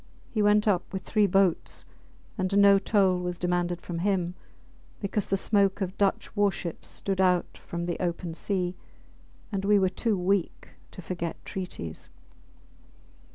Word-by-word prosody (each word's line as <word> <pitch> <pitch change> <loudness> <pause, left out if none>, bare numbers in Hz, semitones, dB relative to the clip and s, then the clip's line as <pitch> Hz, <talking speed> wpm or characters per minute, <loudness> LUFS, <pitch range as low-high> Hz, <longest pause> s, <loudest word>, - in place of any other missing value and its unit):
He 215 - 0
went 210 +1 +4
up 185 -4 +1
with 190 0 -4
three 210 -2 +2
boats, 195 -2 +1 0.5
and 190 -1 0
no 200 -1 +7
toll 195 -3 +2
was 180 0 -3
demanded 175 -1 -1
from 170 -1 -4
him, 180 -2 0 0.7
because 200 0 -1
the 195 - +1
smoke 200 -1 +2
of 190 -1 -3
Dutch 200 +1 0
war 205 -1 +3
ships 170 -3 -6
stood 195 -1 -2
out 180 -2 +2
from 170 0 -3
the 175 -1 -3
open 175 -1 -2
sea, 180 0 -1 0.8
and 195 -2 -2
we 205 +1 +4
were 190 -2 +3
too 215 +1 0
weak 185 0 -1 0.2
to 185 - -10
forget 170 -1 -4
treaties. 180 - -5
190 Hz, 155 wpm, -27 LUFS, 175-200 Hz, 0.8 s, no